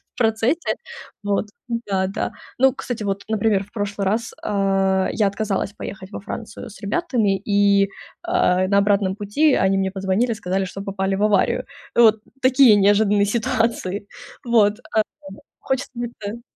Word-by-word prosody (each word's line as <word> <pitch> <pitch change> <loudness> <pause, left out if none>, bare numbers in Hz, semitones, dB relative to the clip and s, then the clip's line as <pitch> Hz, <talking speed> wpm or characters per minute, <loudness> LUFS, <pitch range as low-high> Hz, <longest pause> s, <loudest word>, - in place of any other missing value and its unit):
в - - -51
процессе, 225 +8 +1 0.5
вот 205 +1 0 0.4
да-да. 190 0 -1 0.2
Ну 265 0 +4
кстати, 245 -4 -5
вот, 200 0 -2
например, 215 -2 +1
в 200 - -20
прошлый 205 -2 -3
раз, 220 +5 -1
а, 195 -2 +1
я 210 -3 +2
отказалась 200 -1 -2
поехать 190 -1 -8
во - - -6
Францию 220 +4 -7
с 215 - -14
ребятами 215 - 0
и, 200 -1 +3 0.3
а, 185 - +2
на 200 +1 +3
обратном 200 -1 +2
пути 215 +9 +2
они 190 0 +2
мне 190 0 0
позвонили, 195 +5 0
сказали, 190 -2 -2
что 195 +1 -7
попали 195 -1 -2
в 205 - -1
аварию. 210 +4 +2 0.3
Вот 220 -2 +6 0.2
такие 260 -3 +6
неожиданные 205 0 +4
ситуации. 210 -2 -1 0.4
Вот, 220 -3 +3
а, 220 - +3 0.7
хочется 265 +1 -2 0.3
это 215 +3 -6
205 Hz, 145 wpm, -21 LUFS, 195-225 Hz, 0.7 s, Вот